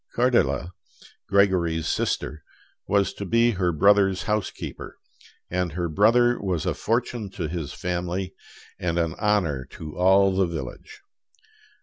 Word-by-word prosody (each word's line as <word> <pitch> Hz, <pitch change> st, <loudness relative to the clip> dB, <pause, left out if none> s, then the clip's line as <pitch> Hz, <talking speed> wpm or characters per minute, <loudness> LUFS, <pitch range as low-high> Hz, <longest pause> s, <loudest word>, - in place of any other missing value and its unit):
Cordele, 120 Hz, -8 st, +2 dB, 0.6 s
Gregory's 90 Hz, -5 st, +2 dB
sister, 75 Hz, -2 st, -2 dB, 0.4 s
was 100 Hz, -1 st, +2 dB
to -, -, -7 dB
be 115 Hz, +4 st, +3 dB
her 90 Hz, -4 st, 0 dB
brother's 95 Hz, +1 st, +3 dB
housekeeper, 105 Hz, -1 st, -4 dB, 0.5 s
and 90 Hz, -3 st, -2 dB
her 90 Hz, +1 st, -2 dB
brother 120 Hz, +8 st, +3 dB
was 90 Hz, -4 st, -2 dB
a 90 Hz, -, +1 dB
fortune 115 Hz, 0 st, -2 dB
to 90 Hz, -4 st, -4 dB
his 80 Hz, -3 st, -4 dB
family 90 Hz, +1 st, -3 dB, 0.5 s
and 85 Hz, -1 st, -1 dB
an 85 Hz, -2 st, 0 dB
honor 95 Hz, -, +1 dB
to 75 Hz, -1 st, -8 dB
all 95 Hz, +2 st, +4 dB
the 95 Hz, -1 st, +2 dB
village. 80 Hz, -7 st, -7 dB
95 Hz, 125 wpm, -24 LUFS, 85-105 Hz, 0.6 s, all